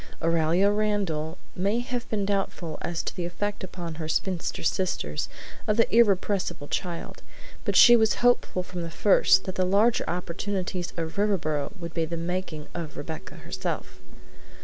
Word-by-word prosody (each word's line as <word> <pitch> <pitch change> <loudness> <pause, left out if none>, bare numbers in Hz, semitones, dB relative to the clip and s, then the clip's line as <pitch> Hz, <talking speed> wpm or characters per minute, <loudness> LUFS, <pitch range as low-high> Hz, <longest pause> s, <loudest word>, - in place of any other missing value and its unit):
Aurelia 165 +4 +3
Randall 195 -7 0 0.2
may 200 +5 +1
have 245 0 -3
been 205 -3 0
doubtful 195 -5 -2
as 170 -1 -2
to - - -4
the 180 - -3
effect 205 +4 -3
upon 175 -3 -6
her 155 - -3
spinster 180 +1 -1
sisters 155 - -1 0.4
of 210 - +2
the 230 -1 +3
irrepressible 195 -7 +2
child, 175 -2 -4 0.4
but - - 0
she 240 - +9
was 220 -2 +4
hopeful 245 -6 +2
from 180 -1 -6
the 165 - -4
first 190 +5 +4
that 190 - -4
the 185 - +1
larger 205 +6 +3
opportunities 180 +1 -3
of 165 +3 -3
Riverboro 160 -7 0
would 170 -1 -6
be 165 -1 0
the 170 +1 -4
"making" 170 -3 -3
of 170 -3 -6
Rebecca 160 +2 -6
herself. - - -4
180 Hz, 155 wpm, -27 LUFS, 165-205 Hz, 0.4 s, she